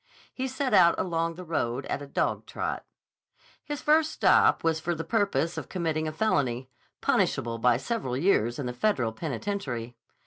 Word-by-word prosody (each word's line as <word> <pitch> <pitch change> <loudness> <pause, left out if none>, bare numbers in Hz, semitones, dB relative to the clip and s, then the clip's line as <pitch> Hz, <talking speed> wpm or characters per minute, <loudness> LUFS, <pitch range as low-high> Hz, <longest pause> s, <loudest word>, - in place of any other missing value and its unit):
He 260 0 -3
set 260 0 -2
out 170 -2 +6
along 165 -2 -1
the 180 - -8
road 135 -6 -2
at - - -3
a 145 - -8
dogtrot. - - -2 0.8
His 295 -2 -5
first 315 +1 +4
stop - - +4
was 165 -1 +1
for 170 +2 -2
the 160 - -4
purpose 200 -6 0
of - - -10
committing 160 -3 -1
a - - -2
felony, 130 - 0 0.3
punishable 115 0 +1
by 120 0 +4
several 130 - -3
years 120 - +2
in 145 - -4
the 125 - -3
Federal 125 - +1
penitentiary. 125 - -4
160 Hz, 165 wpm, -27 LUFS, 125-200 Hz, 0.8 s, out